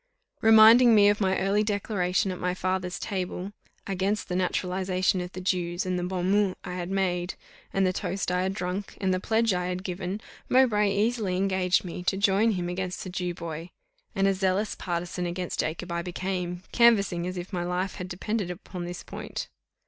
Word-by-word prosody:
Reminding 225 +2 +8
me 205 -1 +7
of 205 +1 +1
my 190 -1 +2
early 195 +2 +2
declaration 200 -3 0
at 180 - -6
my 180 0 -1
father's 185 -1 -2
table 190 -1 -4 0.3
against 195 +2 -1
the 180 - -1
naturalization 185 0 0
of 180 0 -6
the 185 - -6
Jews, 180 -1 -1
and 180 -1 -1
the - - -2
bon 180 0 -1
mot 205 -2 +2
I 180 - -5
had 180 -1 -4
made, 185 -2 -1 0.4
and 195 -1 +2
the 185 - +1
toast 190 0 -2
I 180 0 +1
had 190 +1 -1
drunk, 180 +2 -4
and 190 -2 +1
the 185 - 0
pledge 225 +1 +2
I 180 0 -1
had 180 0 -3
given, 185 +1 -4 0.3
Mowbray 215 -6 +4
easily 205 -2 0
engaged 190 -1 +1
me 180 0 -5
to 190 - +1
join 200 +3 +3
him 180 -2 -2
against 180 +1 -3
the 185 - -7
Jew 180 -1 -3
boy; 165 -1 -6 0.5
and 195 -1 +2
a 195 - +3
zealous 190 +2 0
partisan 175 0 -3
against 180 +1 -4
Jacob 170 +3 -2
I 170 0 -1
became, 180 0 -3
canvassing 200 -7 +4
as 185 0 -4
if 180 +3 -7
my 175 -1 -1
life 180 +2 -2
had 180 -2 -5
depended 195 +2 -2
upon 180 0 -6
this 175 0 -6
point. - - -6
185 Hz, 195 wpm, -27 LUFS, 180-200 Hz, 0.5 s, Reminding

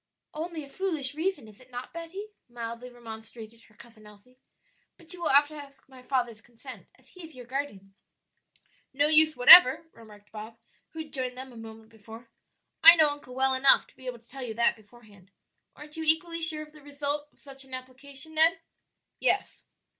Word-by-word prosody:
"Only 320 0 -6
a - - -12
foolish 305 -4 -3
reason, 315 - -3
is 210 -1 -16
it 255 - -20
not, 245 0 -9
Betty?" 340 +5 -8 0.2
mildly 235 +1 -8
remonstrated 225 -1 -12
her 215 - -25
Cousin 225 -2 -17
Elsie. 210 +5 -20 0.6
"But 335 +1 -7
you 355 - -11
will - - 0
have 285 +2 +5
to - - -13
ask 280 -2 -13
my 260 -1 -16
father's 245 -4 -3
consent, 235 0 -13
as - - -25
he 365 - -14
is 320 -3 -12
your 250 -1 -11
guardian." 235 -7 -6 1.0
"No 285 +2 +2
use 310 0 +3
whatever," 260 +3 +9
remarked 210 -2 -17
Bob, 220 +1 -10 0.3
who 320 0 -7
had 305 - -20
joined 255 -2 -3
them 260 0 -9
a - - -15
moment 225 -1 -12
before; 225 +1 -14 0.5
"I 335 +1 +10
know 315 -2 +4
uncle 290 -3 -10
well 265 0 +1
enough 265 +1 +4
to - - -25
be 260 -1 -14
able 250 -1 -5
to 230 0 -26
tell 270 +2 -11
you 235 -3 -6
that 235 +1 +2
beforehand. 210 -3 -20 0.5
Aren't 300 +1 -12
you 320 - -4
equally 330 +2 +1
sure 315 -2 -1
of 305 0 -17
the 305 - -16
result 290 +1 -4
of - - -28
such 270 -2 -9
an 265 -1 -8
application, 270 +4 -12
Ned?" 325 +1 +4 0.6
"Yes." - - -1
260 Hz, 195 wpm, -27 LUFS, 230-305 Hz, 1.0 s, I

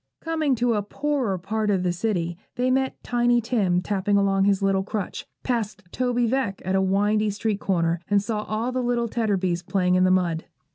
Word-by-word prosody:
Coming 315 -4 0
to 240 0 +1
a 210 - +1
poorer 255 -2 -1
part 210 +4 -2
of 190 -3 +1
the 180 - +1
city, 175 -2 -1 0.2
they 250 +1 +1
met 265 0 0
Tiny 240 0 +2
Tim 205 -7 +1
tapping 200 +1 +1
along 200 -1 +2
on 195 - +3
his 200 0 +2
little 195 -1 +2
crutch, 200 0 -4 0.2
passed 215 -5 -2
Toby 245 -1 0
Veck 230 -5 -1
at 185 - 0
a 190 - +3
windy 205 +3 +2
street 205 0 -2
corner, 170 -4 0
and 205 -1 +4
saw 210 +1 -2
all 220 +4 -2
the 255 0 -1
little 240 -1 0
Tetterbys 195 -6 0
playing 180 -1 +1
in 185 0 +4
the 185 - +4
mud. 175 -3 +1
205 Hz, 200 wpm, -24 LUFS, 190-240 Hz, 0.2 s, and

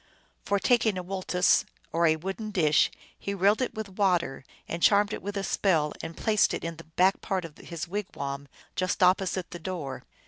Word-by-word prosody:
For 200 - +1
taking 220 -2 +3
a 180 - -3
woltes, 185 0 +2 0.3
or 170 0 +3
a 160 - +4
wooden 195 +6 -5
dish, 155 -7 +3 0.3
he 200 - -3
rilled 200 +5 +3
it 255 - -1
with 220 -1 -4
water, 175 -9 +1 0.2
and 170 - -4
charmed 205 +2 +4
it - - -4
with 205 +1 -4
a 195 - -1
spell, 160 -7 +1
and 165 0 -7
placed 215 -2 +3
it - - -6
in 165 -1 -4
the 165 - -11
back 180 +4 +2
part 190 -3 -2
of 155 -3 -11
his 170 -1 -6
wigwam, 140 -8 -4 0.3
just 185 0 0
opposite 185 0 +2
the 175 - -7
door. 160 -6 -5
185 Hz, 195 wpm, -28 LUFS, 165-200 Hz, 0.3 s, a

